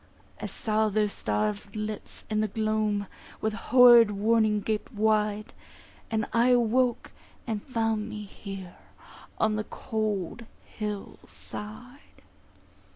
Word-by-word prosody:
I - - -3
saw 215 0 0
their 210 +1 +2
starved 105 - -2
lips 215 -1 -6
in 215 0 0
the 215 - +1
gloam 215 -1 0 0.3
With 220 0 -1
horrid 240 -1 +7
warning 210 +1 +2
gaped 215 0 -2
wide, 215 -1 +1 0.6
And 220 -1 0
I 235 +2 +4
awoke, 245 0 +2 0.3
and 220 -3 -2
found 225 -3 -1
me 210 -1 -6
here 195 -2 -9 0.6
On 215 -1 +2
the 215 - -1
cold 215 0 -3 0.2
hill 210 -2 -5
side. 245 +6 -10
215 Hz, 115 wpm, -28 LUFS, 210-225 Hz, 0.6 s, horrid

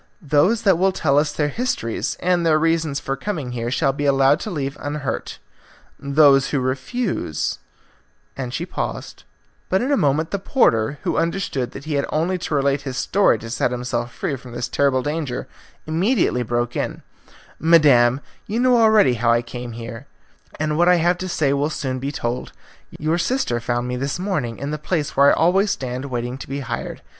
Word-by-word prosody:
Those 175 +8 +2
that 190 -5 +4
will 190 +1 +3
tell 145 -6 +2
us 150 0 0
their 150 0 -1
histories 185 - -2
and 180 -1 +2
their 160 -2 +4
reasons 160 -2 +1
for 135 -2 -3
coming 145 -4 -4
here 120 -1 -3
shall 135 +2 +1
be 145 +1 -3
allowed 135 +1 +4
to - - -5
leave 140 -5 -3
unhurt; 145 -2 -4 0.6
those 140 -1 +4
who 145 - 0
refuse 130 - -2 0.4
" - - -40
And 130 -2 -5
she 165 +7 -3
paused, 180 - -5 0.4
but 190 - +2
in 255 +6 -1
a 285 - +3
moment 150 - +1
the 200 - -1
porter, 140 - +2
who - - -1
understood 165 -7 -1
that 140 - -9
he 155 - -3
had 140 -1 0
only 175 +4 0
to 160 - -3
relate 140 0 +1
his 135 -2 -5
story 200 - +3
to 115 +1 -9
set 120 - +1
himself 120 -1 -3
free 140 - -3
from 125 -1 -12
this 120 - -3
terrible 135 -2 +1
danger, 150 -3 -3 0.4
immediately 170 - +1
broke 120 0 -2
in, - - -3 0.6
"Madam, 140 -6 +5 0.3
you 220 +3 -2
know 250 0 +4
already 220 - +5
how 120 0 +1
I 120 +1 +2
came 120 0 -7
here, 115 +3 -8 0.5
and 155 +1 -1
what 175 +1 +5
I 180 - +6
have 175 +1 +2
to 185 - -4
say 145 -5 +1
will 140 +2 0
soon 130 -4 -3
be 135 +2 -3
told. 120 -3 -4 0.4
Your 155 +3 0
sister 245 - 0
found 120 +1 -2
me 125 0 -3
this 135 +2 -2
morning 165 - -2
in 140 +2 -4
the 150 - -3
place 150 -1 -2
where 140 +1 +6
I - - +5
always 190 +5 +3
stand 130 -6 -3
waiting 125 -1 -4
to - - -9
be 140 +1 -3
hired. 120 -2 -5
140 Hz, 195 wpm, -21 LUFS, 125-170 Hz, 0.6 s, I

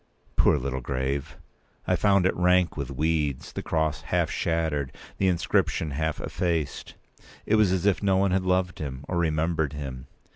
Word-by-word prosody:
Poor - - +4
little 65 0 -3
grave! 70 +3 -3 0.5
I - - +2
found 100 -3 +3
it 95 - +2
rank 90 -1 +3
with 70 -4 -4
weeds, 75 0 -1
the - - -4
cross 80 -3 -1
half - - 0
shattered, 80 -5 -1 0.3
the 95 - +3
inscription 85 -3 +1
half 80 +2 -2
effaced. 80 -5 -2 0.5
It - - 0
was 105 -4 +4
as 95 0 0
if 100 -2 +3
no 95 -2 +3
one 95 0 +2
had 95 +1 +2
loved 90 -1 0
him, 70 -2 -5
or 90 - -1
remembered 80 -2 0
him. 65 -4 -6
80 Hz, 170 wpm, -26 LUFS, 70-90 Hz, 0.5 s, Poor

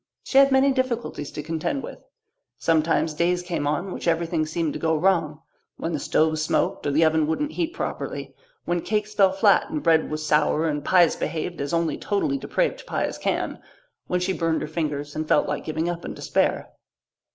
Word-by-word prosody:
She 270 - +4
had 275 0 +6
many 265 +1 +4
difficulties 245 - -2
to 150 - -5
contend 165 - -2
with. - - -8 0.6
Sometimes 160 -1 +1
days 175 +3 +1
came 170 -5 -2
on 175 +6 -1
which - - -5
everything 165 -1 +1
seemed 160 -1 -1
to - - -5
go 160 0 +1
wrong 160 -3 +1 0.3
when 165 - -3
the 150 - -1
stove 155 +1 +1
smoked 155 -1 0
or - - +1
the 160 +3 +4
oven 160 -1 +2
wouldn't 295 - -1
heat 340 +1 -2
properly, - - -4 0.3
when 175 0 0
cakes 210 +1 -2
fell 195 -2 +4
flat 195 +5 +3
and 305 -1 -3
bread 160 -1 +3
was 155 0 -4
sour 155 +1 +2
and 150 -2 -2
pies 175 -1 +4
behaved 165 0 -3
as 140 - -3
only 165 -3 0
totally 275 +8 0
depraved - - -1
pies - - -2
can, - - -2 0.5
when 180 - 0
she 180 +1 0
burned 165 -3 0
her - - -4
fingers 150 -2 -3
and 155 0 -3
felt - - +3
like - - -3
giving 160 +1 -2
up 175 -1 -3
in - - -6
despair. - - 0
165 Hz, 195 wpm, -24 LUFS, 155-195 Hz, 0.6 s, had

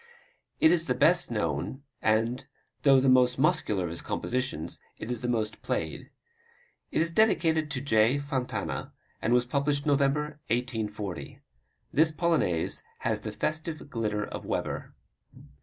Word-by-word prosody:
It 160 - +6
is 170 -1 +3
the 125 - +1
best 170 +7 +4
known 105 - -2 0.2
and, 115 +4 +1 0.3
though 135 -2 +6
the 135 - +2
most 125 -1 +5
muscular 105 -8 +2
of 85 - -3
his 85 - -5
compositions, 125 - -3 0.2
it 115 - -5
is 120 - -2
the 125 - -2
most 110 -3 -1
played. - - -3 0.8
It - - +1
is 165 - -1
dedicated 165 -6 +3
to 125 - -3
J. 115 -1 +3
Fontana, 140 -3 -3 0.3
and 115 - 0
was 125 0 +4
published 140 +2 0
November, 150 +1 +1
1840. 105 - -3 0.5
This 160 +2 +5
Polonaise 155 - +1 0.2
has 110 -2 0
the 110 - -4
festive 155 +4 -3
glitter 105 -4 -1
of - - -7
Weber. - - -3
125 Hz, 140 wpm, -28 LUFS, 110-150 Hz, 0.8 s, It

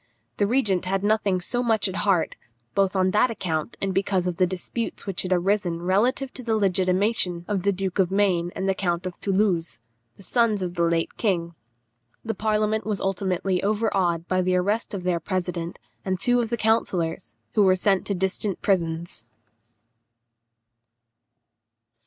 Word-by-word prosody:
The 205 - +2
regent 205 -7 +1
had 195 +1 -1
nothing 205 -3 +2
so 245 +7 -1
much 225 -4 +2
at 190 +1 -4
heart, 200 -5 +1 0.4
both 195 -1 +1
on 185 0 +2
that 215 +5 +3
account 175 -4 -3
and 195 -1 0
because 190 -1 0
of 180 -2 -2
the 185 - +3
disputes 190 +6 -4
that 195 -3 -1
had 185 - -4
arisen 180 -2 +1
relative 240 +9 +1
to - - -7
the 225 -2 0
legitimation 185 -2 +1
of 205 -3 -1
the 200 +2 +2
Duke 190 0 -3
of 185 -2 +3
Maine 190 -3 +1
and 190 - -2
the 195 - +3
Count 175 -2 -1
of 185 - -3
Thoulouse, 190 -4 0 0.4
the 195 - -13
sons 220 -2 +2
of 175 -1 -3
the 170 - -2
late 170 -1 0
king. 170 -6 0 0.7
The 225 - -1
parliament 215 0 0
was 210 -2 -2
ultimately 190 -1 -1
overawed 195 -5 0
by 185 0 +1
the 185 0 +1
arrest 205 +4 0
of 185 - -5
their 180 -2 0
president 175 -1 -3 0.3
and 185 -1 -2
two 245 +3 +2
of 230 - -3
the 235 - -1
councillors, 190 -6 0 0.2
who 215 - +3
were 190 -2 +5
sent 195 0 +1
to 200 - -1
distant 190 +1 -1
prisons. 170 - -1
190 Hz, 170 wpm, -24 LUFS, 180-210 Hz, 0.7 s, were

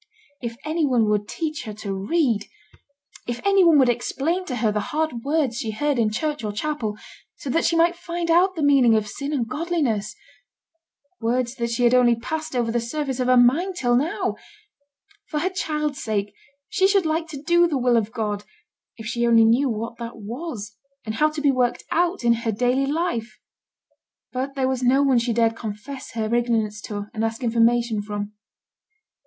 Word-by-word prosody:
If 235 -1 -5
any 315 +1 0
one 245 -6 +3
would 210 0 0
teach 310 -5 -4
her 215 - -6
to 205 -2 -5
read! 215 - 0 0.8
If 240 0 -3
any 395 -1 +5
one 335 -3 +6
would 265 -3 +5
explain 280 +9 -1
to 260 - -4
her 220 -2 +1
the 210 - -1
hard 305 -7 -2
words 280 -5 0
she 225 - -3
heard 275 +5 0
in 220 -2 +3
church 295 +4 -2
or 210 - -2
chapel, 220 -2 -3 0.4
so 270 - -5
that 330 - +1
she 335 - +2
might 340 +1 +4
find 340 0 -3
out 370 +3 +4
the 315 - -2
meaning 270 -5 +5
of 215 -1 0
sin 280 +6 -5
and 255 -6 -1
godliness! 260 - -1 1.0
words 240 +1 0
that 235 -2 -2
had 245 0 +3
only 245 -2 +5
passed 310 +5 -5
over 235 -2 +1
the 240 - +1
surface 265 +2 -3
of 250 - 0
her 255 0 +5
mind 305 +11 +3
till 245 -7 +1
now! 295 +7 0 0.9
For 300 - -2
her 370 +3 0
child's 300 -6 -2
sake 210 -2 -2 0.3
she 380 - +2
should 390 -3 +3
like 320 +1 0
to 300 -4 -7
do 345 +1 +4
the 300 -4 -1
will 245 -1 +2
of 220 -2 +1
God, 210 -3 -3 0.5
if 225 - -9
she 235 +1 0
only 230 -1 +6
knew 250 +5 +3
what 230 +1 -4
that 235 0 -6
was, 220 -1 -6 0.3
and 215 - -3
how 305 +8 +3
to 305 -1 -5
be 285 -1 +4
worked 250 -2 0
out 350 -1 +1
in 235 0 +5
her 230 - 0
daily 250 +5 +1
life. 275 -9 -2 1.0
But 265 +2 -3
there 265 -1 +1
was 260 -1 -1
no 260 +3 +4
one 265 -3 +4
she 235 +1 -1
dared 230 0 +2
confess 230 +5 -7
her 220 0 -2
ignorance 225 -3 0
to 205 -1 -4
and 220 -1 -2
ask 225 +3 -2
information 235 -1 +2
from. 205 0 -5
245 Hz, 195 wpm, -23 LUFS, 225-305 Hz, 1.0 s, one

